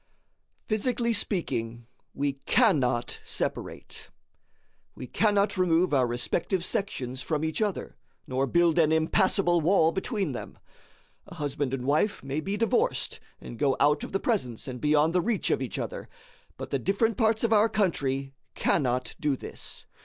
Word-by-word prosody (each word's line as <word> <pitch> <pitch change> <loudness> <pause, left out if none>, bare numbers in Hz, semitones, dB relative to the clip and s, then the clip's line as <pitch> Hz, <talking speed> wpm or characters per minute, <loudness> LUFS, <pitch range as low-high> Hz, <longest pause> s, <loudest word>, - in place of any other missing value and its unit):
Physically 235 +2 0
speaking, 120 - -2 0.3
we 140 0 0
cannot 135 - +1
separate. - - -4 0.9
We - - -7
cannot 205 - +1
remove 175 -2 +3
our 130 -3 +3
respective 170 +9 -1
sections 130 -10 -2
from 155 +1 -1
each 160 +6 -2
other, 210 -3 -2 0.3
nor 130 +1 -1
build 170 +3 +3
an 155 -1 +4
impassable 175 +2 +2
wall 165 -1 +4
between 195 - -2
them. 125 - -7 0.7
A - - -11
husband 145 -3 -2
and 130 -2 -3
wife 155 +9 +1
may 135 +2 -2
be 195 +6 -3
divorced, 225 -1 0 0.2
and 120 - -10
go 140 -2 +2
out 145 +1 +3
of - - -6
the 195 - 0
presence 140 - -2
and 125 -2 -6
beyond 150 +2 +3
the 180 - +3
reach 220 +1 -1
of - - +1
each - - -4
other; - - -5 0.5
but - - -7
the - - 0
different 220 +3 +1
parts 220 +1 +1
of 230 -1 +3
our 215 +1 +5
country 140 -10 -1 0.2
cannot 125 -4 0
do 150 -2 +1
this. - - -9
160 Hz, 155 wpm, -27 LUFS, 135-200 Hz, 0.9 s, our